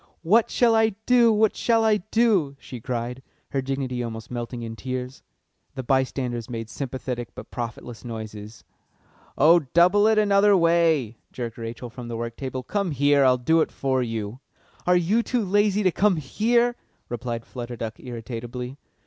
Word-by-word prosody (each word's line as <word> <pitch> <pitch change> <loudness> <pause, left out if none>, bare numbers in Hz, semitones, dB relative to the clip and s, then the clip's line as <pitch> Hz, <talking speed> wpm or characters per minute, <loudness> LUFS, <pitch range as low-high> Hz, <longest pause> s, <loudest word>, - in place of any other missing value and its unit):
"What 215 +7 +4
shall 235 -2 +3
I 220 -2 +3
do? 240 -2 +5
What 215 0 +3
shall 230 -1 +2
I 220 -1 +4
do?" 205 -8 +1
she 125 -3 -9
cried, 125 +2 -4 0.3
her 135 - -1
dignity 130 -2 -3
almost 115 -1 -6
melting 120 0 -5
in 115 0 -6
tears. 130 +1 -5 0.5
The 130 - -4
by 130 +2 +3
standers 125 -3 -4
made 115 -2 -5
sympathetic 125 -2 -5
but - - -10
profitless 120 -1 -6
noises. 110 -2 -8 0.7
"Oh, 165 +5 +6
double 175 +8 +4
it 220 0 +3
another 205 -1 +5
way," 165 - +2
jerked 120 -2 -6
Rachel 115 +1 -6
from 120 0 -8
the 115 -1 -4
work 115 0 -4
table. 130 -1 -5
"Come 200 - -1
here, 145 -1 +3
I'll 130 -1 +5
do 160 +6 +3
it - - -1
for 130 -1 0
you." 115 -1 -4 0.5
"Are 180 0 +5
you 190 +7 +2
too 235 -2 -1
lazy 205 +1 +2
to 185 - +3
come 205 +2 +3
here?" 235 - +1 0.3
replied 120 -1 -4
Flutter 120 -1 -7
Duck 110 -1 -6
irritably. 120 +2 -7
130 Hz, 165 wpm, -24 LUFS, 120-195 Hz, 0.7 s, Oh